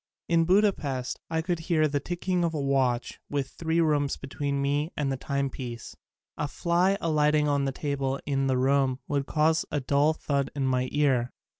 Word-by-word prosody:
In 165 -1 +3
Budapest 165 - +1
I 160 0 -1
could 175 -1 -1
hear 155 -2 +4
the 145 -1 -1
ticking 175 +2 -1
of 165 -1 0
a - - -1
watch 135 -3 0
with 140 -2 -2
three 165 0 -1
rooms 150 -4 +1
between 140 +1 -3
me 145 +3 0
and 140 -2 0
the - - 0
time 140 +1 -2
piece. 120 -3 -7 0.4
A 150 - -1
fly 175 +6 +1
alighting 150 -2 +2
on 140 -1 +1
a - - 0
table 135 -1 -2
in 135 -1 0
the 130 -1 +2
room 135 0 +2
would 140 -1 -1
cause 160 +2 +2
a 145 - -1
dull 140 +3 +2
thud 140 -3 -1
in 140 -2 -1
my 130 -1 +1
ear. 135 -5 +2
145 Hz, 185 wpm, -27 LUFS, 135-160 Hz, 0.4 s, hear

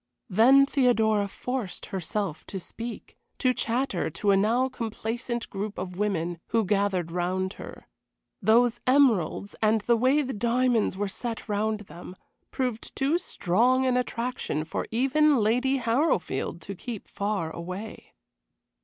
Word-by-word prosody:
Then 260 +8 +6
Theodora 225 -7 +2
forced 245 0 -4
herself 190 -2 -2
to 195 - -5
speak 230 +6 -8 0.2
to 255 -1 +2
chatter 235 -8 -1
to 200 +6 0
a - - +5
now 230 +6 +2
complacent 235 0 -4
group 205 +1 -4
of 180 0 -5
women 175 -4 -1
who 225 -2 +1
gathered 190 -4 0
round 185 +2 -1
her. - - -10 0.5
Those 235 +3 +4
emeralds, 230 - +3
and 220 0 +3
the 235 +3 +3
way 260 +6 +3
the 265 0 -4
diamonds 235 -2 +1
were 205 +1 -1
set 230 +5 -5
round 215 0 -1
them, 180 -1 -11 0.3
proved 250 -4 -3
too 285 +6 +1
strong 250 - +2
an 255 -1 +2
attraction 245 -10 -2
for 160 - -4
even 275 +5 +3
Lady 250 +5 +2
Harrowfield 230 - 0
to 200 - -6
keep 220 +2 -7
far 200 -5 -2
away. 185 +6 -8
220 Hz, 135 wpm, -27 LUFS, 195-250 Hz, 0.5 s, Then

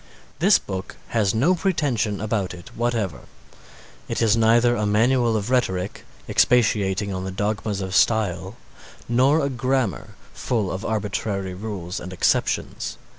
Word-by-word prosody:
This - - +6
book 95 0 -6
has 110 -3 +1
no 140 +11 +3
pretension 145 - 0
about 105 -4 -2
it 90 0 -12
whatever, 115 - -1 0.9
it - - -2
is 115 -1 +4
neither 115 +2 +4
a 105 -2 0
Manual 115 +2 +3
of 105 +4 -3
Rhetoric, 95 -7 -1 0.2
expatiating 100 -4 +2
on 95 0 -4
the 95 - -4
dogmas 105 +1 -2
of 95 -1 -4
style, 105 -2 +1 0.5
nor 130 +6 +3
a 140 - +1
Grammar 130 -3 -1 0.2
full 110 -6 -1
of 95 - -4
arbitrary 105 -3 -2
rules 95 -2 -5
and 90 - -8
exceptions. 90 - 0
105 Hz, 135 wpm, -23 LUFS, 95-120 Hz, 0.9 s, This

